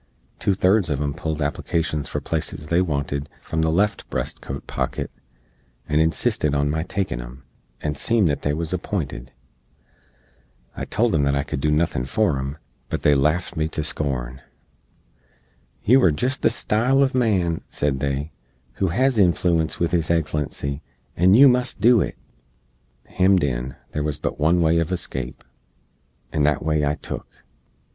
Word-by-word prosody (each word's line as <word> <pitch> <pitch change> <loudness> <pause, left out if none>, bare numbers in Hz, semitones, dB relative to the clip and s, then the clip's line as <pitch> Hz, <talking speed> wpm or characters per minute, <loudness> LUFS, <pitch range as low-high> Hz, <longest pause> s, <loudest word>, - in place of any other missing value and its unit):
Two 100 - +1
thirds 95 0 +3
uv 70 -2 -1
em 70 -1 -1
pulled 80 +1 -3
applicashens 75 +1 -1
for - - -3
places 75 -2 -3
they 85 +2 +3
wanted 70 -3 -2
from 80 - -2
the 80 0 +2
left 100 +5 0
breast - - -3
coat 70 +1 -6
pocket, - - -3 0.8
and 75 0 +2
insistid 75 -2 +1
on 70 +1 +1
my 80 +1 -1
takin 90 -8 -2
em, 60 +3 -11 0.4
and 75 -1 -2
seem 115 +7 +2
that 75 -4 +1
they 75 - 0
was 80 +3 -2
appinted. 80 - -4 1.4
I - - -4
told 115 -1 +1
em 80 - +3
that 70 0 +2
I 70 - 0
cood 65 -1 -4
do 75 - +1
nuthin 75 -4 +1
for 105 - +1
em; 70 +2 -4 0.3
but - - -3
they 75 - +5
laft 75 +7 +1
me 80 -1 0
to 80 - -3
skorn. 65 -4 -3 1.4
"You 130 +5 +5
are 90 - +5
jist 125 - -1
the - - +4
style 120 +5 +1
uv 135 -1 +3
man," 95 -10 +1
said 70 -2 -1
they, 70 +2 -2 0.5
"who 95 - +1
hez 125 +6 +2
inflooence 85 -3 +2
with 85 - 0
His 85 -2 0
Eggslency, 75 -3 -1 0.3
and 95 +5 +5
yoo 140 +2 +9
must 125 -2 +1
do 115 +1 +5
it." - - -3 0.9
Hemmed 95 -2 +3
in, 65 -1 -2 0.2
there 75 - -2
wuz 75 0 -1
but - - -3
one 85 +4 +3
way 80 +1 +3
uv 85 +1 0
escape, 65 -8 -4 0.9
and 75 -2 +1
that 75 +1 +1
way 75 -1 +1
I 75 +1 +1
took. - - -8
80 Hz, 165 wpm, -23 LUFS, 70-95 Hz, 1.4 s, yoo